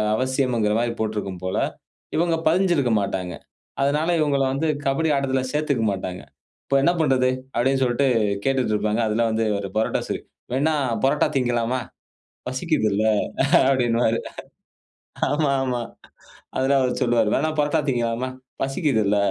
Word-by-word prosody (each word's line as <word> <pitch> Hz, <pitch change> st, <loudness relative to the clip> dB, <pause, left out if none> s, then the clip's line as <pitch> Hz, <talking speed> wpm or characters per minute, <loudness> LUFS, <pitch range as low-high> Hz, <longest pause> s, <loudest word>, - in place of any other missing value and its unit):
அவசியம் 130 Hz, +1 st, 0 dB
இங்கர 105 Hz, -1 st, +2 dB
மாரி 120 Hz, 0 st, 0 dB
போட்டிருக்கும் 105 Hz, -4 st, -3 dB
போல. 95 Hz, 0 st, -2 dB, 0.6 s
இவங்க 170 Hz, 0 st, +2 dB
பதிஞ்சிருக்க 170 Hz, -7 st, +2 dB
மாட்டாங்க. 95 Hz, -3 st, -3 dB, 0.5 s
அதனால 150 Hz, +4 st, +1 dB
இவங்களா 140 Hz, -3 st, +2 dB
வந்து 150 Hz, +4 st, -1 dB, 0.2 s
கபடி 140 Hz, +4 st, +1 dB
ஆட்டத்தில 135 Hz, -1 st, 0 dB
சேர்த்துக்க 150 Hz, -6 st, 0 dB
மட்டாங்க. 90 Hz, -2 st, -5 dB, 0.4 s
இப்போ 140 Hz, -, 0 dB
என்ன 170 Hz, -, +4 dB
பண்றது, 130 Hz, -4 st, +3 dB, 0.3 s
அப்டின்னு 135 Hz, +3 st, +2 dB
சொல்லிட்டு 130 Hz, +2 st, +2 dB, 0.4 s
கேட்டுக்கிட்டு 130 Hz, -5 st, +1 dB
இருப்பாங்க. 105 Hz, +1 st, 0 dB
அதில 110 Hz, +2 st, +1 dB
வந்து 110 Hz, +1 st, 0 dB
இவரு 100 Hz, -1 st, -2 dB
பரோட்டா 110 Hz, -, +1 dB
சூரி, -, -, -3 dB, 0.3 s
வேன்ன 145 Hz, +5 st, +2 dB, 0.3 s
பரோட்டா 140 Hz, +2 st, +3 dB
திங்கலாமா, 120 Hz, -1 st, 0 dB, 0.7 s
பசிக்குதில, 125 Hz, -, 0 dB, 0.7 s
அப்டினுவாறு. 120 Hz, -3 st, +2 dB, 1.1 s
ஆமா, 150 Hz, -1 st, +1 dB
ஆமா. 125 Hz, -2 st, -1 dB, 0.8 s
அதில 135 Hz, +1 st, +2 dB
அவர் 125 Hz, -1 st, 0 dB
சொல்லுவார். 115 Hz, -3 st, +2 dB
வேணா 155 Hz, +3 st, +1 dB
பரோட்டா 150 Hz, +2 st, +2 dB
திங்கலாமா? 120 Hz, 0 st, -1 dB, 0.3 s
பசிக்குதில. 135 Hz, -, +1 dB
130 Hz, 125 wpm, -23 LUFS, 110-140 Hz, 1.1 s, என்ன